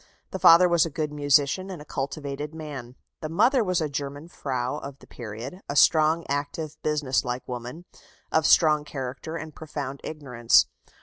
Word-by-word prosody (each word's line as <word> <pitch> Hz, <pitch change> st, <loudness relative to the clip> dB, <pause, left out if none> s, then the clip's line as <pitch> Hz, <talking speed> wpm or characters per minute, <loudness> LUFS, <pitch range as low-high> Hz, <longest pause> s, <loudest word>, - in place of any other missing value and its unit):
The 190 Hz, -, -4 dB
father 170 Hz, +2 st, +8 dB
was 170 Hz, -2 st, +4 dB
a 165 Hz, -, -2 dB
good 155 Hz, 0 st, -3 dB
musician, 145 Hz, +5 st, +2 dB
and 185 Hz, -4 st, -6 dB
a 150 Hz, -, -11 dB
cultivated 145 Hz, +2 st, -5 dB
man. 140 Hz, -6 st, -8 dB, 0.3 s
The 155 Hz, -, -4 dB
mother 235 Hz, -, +3 dB
was 185 Hz, -4 st, 0 dB
a 155 Hz, -, 0 dB
German 145 Hz, +2 st, -5 dB
Frau 130 Hz, -2 st, -3 dB
of 140 Hz, -1 st, -8 dB
the -, -, -17 dB
period, 120 Hz, -, -8 dB
a 140 Hz, -, -3 dB
strong, 155 Hz, +2 st, +4 dB
active, 145 Hz, +2 st, -3 dB
business 150 Hz, -4 st, 0 dB
like 125 Hz, -1 st, -4 dB
woman, 125 Hz, +7 st, -7 dB, 0.5 s
of 160 Hz, -1 st, +3 dB
strong 155 Hz, -3 st, +5 dB
character 135 Hz, +2 st, -6 dB
and 155 Hz, 0 st, -8 dB
profound 145 Hz, -3 st, -6 dB
ignorance. 125 Hz, -7 st, +2 dB
150 Hz, 170 wpm, -26 LUFS, 135-160 Hz, 0.5 s, father